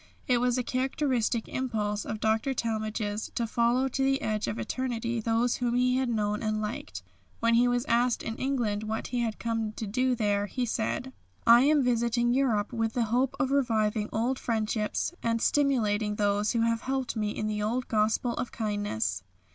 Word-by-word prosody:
It 250 -2 +3
was 245 0 +1
a 250 - 0
characteristic 255 -3 0
impulse 215 -5 -2
of 215 - -4
Dr. 220 +5 +1
Talmage's 215 -2 -2
to 235 - 0
follow 235 +3 +2
to 270 +1 -1
the 270 0 +2
edge 215 -1 -1
of 115 -1 -3
eternity 235 - -2
those 230 +2 +1
whom 240 -1 0
he 250 +1 +3
had 260 -1 0
known 210 -2 0
and 215 -1 -1
liked. 215 +2 -5 0.4
When 230 0 +2
he 240 +1 +5
was 245 +1 +1
asked 240 -2 +2
in 225 - -4
England 240 -6 -1
what 220 +1 -3
he 245 - -1
had 230 -2 -1
come 225 -2 -2
to 220 - -5
do 255 +5 +1
there, 205 -2 0
he 250 +4 -2
said: 240 +3 -2 0.3
"I 235 +1 +8
am 295 -1 +4
visiting 240 0 +2
Europe 245 -5 +1
with 225 -1 -1
the 245 - +1
hope 260 +2 +2
of 270 -2 +1
reviving 220 -6 +1
old 245 +4 0
friendships 220 +4 -1
and 230 0 0
stimulating 220 -7 +1
those 205 0 +1
who 230 - +1
have 230 0 +1
helped 265 -2 -2
me 210 -1 -1
in 215 - -3
the 210 -1 -2
old 240 +4 -1
gospel 220 +2 +1
of 250 - -3
kindness." 205 - -2
230 Hz, 185 wpm, -28 LUFS, 215-250 Hz, 0.4 s, I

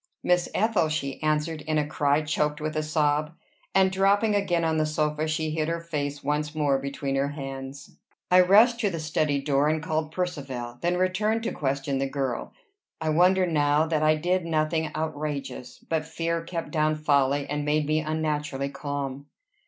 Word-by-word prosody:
"Miss 180 0 +2
Ethel," 210 -7 +2
she 140 -3 -3
answered 155 +1 0
in 155 0 +1
a 150 - +2
cry 145 0 +1
choked 150 0 0
with 155 0 -3
a 155 - +1
sob; 150 0 0 0.4
and 190 -1 +5
dropping 200 +3 +3
again 185 -4 +1
on 160 -1 +1
the 155 - +2
sofa, 155 0 -1
she 155 0 -1
hid 155 0 -1
her 170 0 -1
face 145 -4 -4
once 150 +2 -1
more 145 -3 +2
between 140 0 -3
her 135 +1 +1
hands. 135 -1 -7 0.3
I 180 0 +8
rushed 220 +6 +5
to 210 -4 +1
the 170 -3 -4
study 155 -2 0
door, 140 +1 +1
and 155 +1 +1
called 155 -1 -2
Percivale; 135 -10 -4
then 175 +1 +1
returned 210 +5 +1
to 230 - -1
question 140 -1 -1
the 135 0 -1
girl. 135 -3 -3 0.5
I 160 -1 -1
wonder 180 +4 +4
now 150 -2 +2
that 155 -1 0
I 155 0 +4
did 180 +4 0
nothing 160 -1 0
outrageous; 150 -4 -4
but 160 -1 -1
fear 165 0 -2
kept 165 0 -5
down 155 -1 +1
folly, 145 -2 +2
and 145 0 -2
made 150 +1 +1
me 155 +1 +1
unnaturally 150 -3 -2
calm. 140 -1 -5
155 Hz, 180 wpm, -26 LUFS, 145-165 Hz, 0.5 s, I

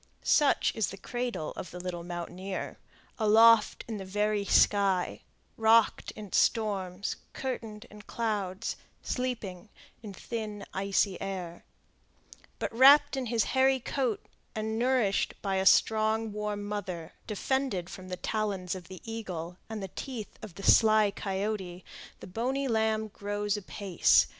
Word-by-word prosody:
Such 295 -3 +3
is 220 -2 0
the 195 - -7
cradle 240 -6 -3
of - - -6
the 180 - -8
little 175 -1 -5
mountaineer, 175 +2 -5 0.4
aloft 225 +1 +5
in 225 -2 -4
the 195 - -6
very 210 +2 0
sky; 195 -3 +3 0.4
rocked 225 0 +4
in 210 -3 -9
storms, 200 -4 0 0.2
curtained 225 -5 -5
in 210 0 -11
clouds, 210 -2 -3 0.3
sleeping 225 -7 -3 0.3
in 215 -3 -8
thin, 215 -1 -5
icy 195 -1 0
air; 180 -3 -5 0.9
but, - - -3
wrapped 285 +3 +7
in 260 -2 -2
his 230 -1 +2
hairy 265 0 +4
coat, 250 -3 -2 0.3
and 220 +1 -2
nourished 245 -5 +1
by 195 -2 0
a 190 0 +2
strong, 220 +1 +3
warm 210 -1 -3
mother, 195 -5 -5
defended 225 -3 -1
from 185 0 -9
the 180 0 -5
talons 200 -4 -2
of 180 -3 -8
the 185 -1 -10
eagle 180 -7 -6
and 220 -3 -5
the - - -3
teeth 235 +1 -7
of 190 -6 -9
the 195 - -9
sly 215 -2 +5
coyote, 195 -2 -3 0.4
the - - -8
bonny 255 +8 -2
lamb 220 -2 +1
grows 205 0 -2
apace. 200 -2 +3
210 Hz, 140 wpm, -29 LUFS, 190-225 Hz, 0.9 s, wrapped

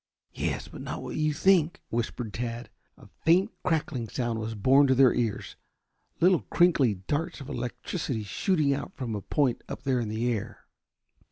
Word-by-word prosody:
"Yes, - - -2
but - - -10
not - - -5
what - - -6
you 155 0 +1
think," 175 +2 +3
whispered 115 -1 -3
Tad. 115 -1 -4 0.3
A - - -16 0.2
faint 185 +6 +4
crackling 150 - -1
sound 120 -3 -2
was 110 +1 -4
borne 135 +7 +5
to 130 - +4
their 130 -1 +6
ears, 115 -4 -2 0.6
little 180 0 +4
crinkly 150 - +4
darts 150 - -3
of 140 - -9
electricity 125 - -3
shooting 150 - +1
out 145 +7 -5
from 125 -5 -4
a 105 - -3
point 135 +2 0
up - - -6
there 130 -3 +1
in 115 -3 -2
the 110 +3 -1
air. 105 - -6
130 Hz, 170 wpm, -28 LUFS, 115-155 Hz, 0.6 s, their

